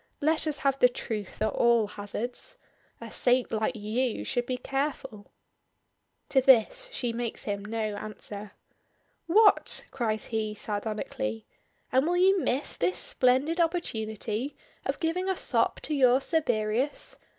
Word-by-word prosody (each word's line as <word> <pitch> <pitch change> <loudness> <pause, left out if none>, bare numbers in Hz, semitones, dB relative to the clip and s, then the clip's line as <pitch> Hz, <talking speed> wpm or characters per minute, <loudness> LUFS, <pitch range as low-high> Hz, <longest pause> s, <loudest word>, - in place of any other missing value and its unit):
Let 315 +2 +1
us 300 -1 -1
have 275 0 +2
the 250 - +6
truth 215 -4 -5
at 220 - +2
all 235 -2 +3
hazards. 235 - -4 0.4
A - - -9
saint 250 0 +3
like 220 +3 0
you 220 +3 -1
should 245 -2 -1
be 255 - -1
careful." 270 -5 -4 1.0
To 265 - +4
this 265 - +4
she 245 - -2
makes 235 -1 -3
him 200 -1 -3
no 220 +2 -5 0.2
answer. 205 -1 -7 0.7
"What!" 415 +5 +5
cries 220 -4 -1
he, 215 -1 -1
sardonically; 205 - -3 0.5
"and 260 +4 +3
will 350 +1 +1
you 380 +2 +5
miss 275 -3 0
this 180 +2 0
splendid 270 +7 +2
opportunity 230 - -2 0.3
of - - -2
giving 360 +3 -1
a 380 - +1
sop - - +1
to 310 - -3
your 260 -2 +5
Cerberus? 250 -4 -1
245 Hz, 140 wpm, -28 LUFS, 215-290 Hz, 1.0 s, the